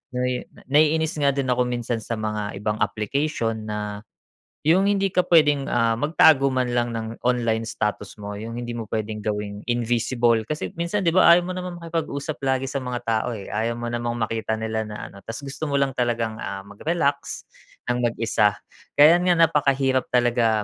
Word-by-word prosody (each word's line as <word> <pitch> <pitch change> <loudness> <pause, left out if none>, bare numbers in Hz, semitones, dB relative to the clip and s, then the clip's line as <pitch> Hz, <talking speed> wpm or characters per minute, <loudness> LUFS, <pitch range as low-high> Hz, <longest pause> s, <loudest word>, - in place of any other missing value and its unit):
Nai 125 0 -1 0.2
naiinis 155 +3 +3
nga 140 -1 +3
din 135 -2 -1
ako 125 0 +2
minsan 120 -1 -2
sa 115 - -3
mga 105 -2 -3
ibang 105 +1 -1
application 115 -1 -2
na 105 -1 -4 0.6
yung 185 +6 +4
hindi 195 -2 +1
ka 180 - +1
puwedeng, 150 -4 +4
ah, 115 0 +2
magtago 150 -2 +5
man 130 -2 0
lang 120 -1 0
ng 115 0 -5
online 115 -2 +1
status 105 -2 -3
mo 105 -1 -7
yung 115 +1 -6
hindi 120 0 -4
mo 115 -2 -5
puwedeng 110 0 -3
gawing 105 -1 -3
invisible 120 0 +1
kasi 150 +3 -3
minsan, 185 +4 -1
'di 165 - +3
ba, 185 +2 +5
ayaw 175 - +2
mo 185 - -4
namang 180 -1 -5
makipag-usap 155 -3 -3
lagi 135 -1 0
sa 135 +1 -2
mga 125 -1 -4
tao, 115 +1 -1
eh. 100 - -8
Ayaw 115 +3 -1
mo 120 0 -4
namang 120 0 -2
makita 110 -1 -2
nila 110 0 -3
na 105 - -7
ano. 100 - -13
Ta's 115 +8 -8
gusto 140 +3 -5
mo 140 - -1
lang 140 -1 +2
talagang, 115 -3 -1
ah, 95 0 -5
mag-relax 140 - -2 0.5
ng 120 - -1
mag-isa. 110 -3 +1 0.4
Kaya 170 +5 +6
nga 175 - +5
napakahirap 135 -4 +2
talaga 120 -3 +2
120 Hz, 180 wpm, -23 LUFS, 110-145 Hz, 0.6 s, Kaya